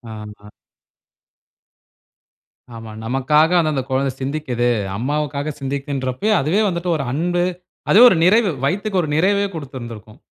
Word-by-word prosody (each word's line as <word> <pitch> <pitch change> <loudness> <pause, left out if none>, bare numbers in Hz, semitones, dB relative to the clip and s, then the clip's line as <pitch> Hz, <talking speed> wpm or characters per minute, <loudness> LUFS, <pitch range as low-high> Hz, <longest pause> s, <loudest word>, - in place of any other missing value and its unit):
ஆமா. 105 -1 -11 2.3
ஆமா. 115 -1 -9
நமக்காக 135 +7 +2
அந்தந்த 155 -5 0
கொழந்த 135 0 0
சிந்திக்குது. 130 -4 -1 0.3
அம்மாவுக்காக 145 +3 -2
சிந்திக்குன்றப்பயே, 140 +6 -2
அதுவே 170 +10 +1
வந்துட்டு 170 0 -3
ஒரு 140 - -3
அன்பு, 175 +4 0 0.5
அதுவே 220 +5 +7
ஒரு 185 - +2
நிறைவு. 210 +2 +4 0.2
வயித்துக்கு 195 +5 -1
ஒரு 155 - -4
நிறைவே 200 +5 +2
குடுத்திருந்திருக்கும். 120 -6 -9
145 Hz, 110 wpm, -19 LUFS, 130-175 Hz, 2.3 s, அதுவே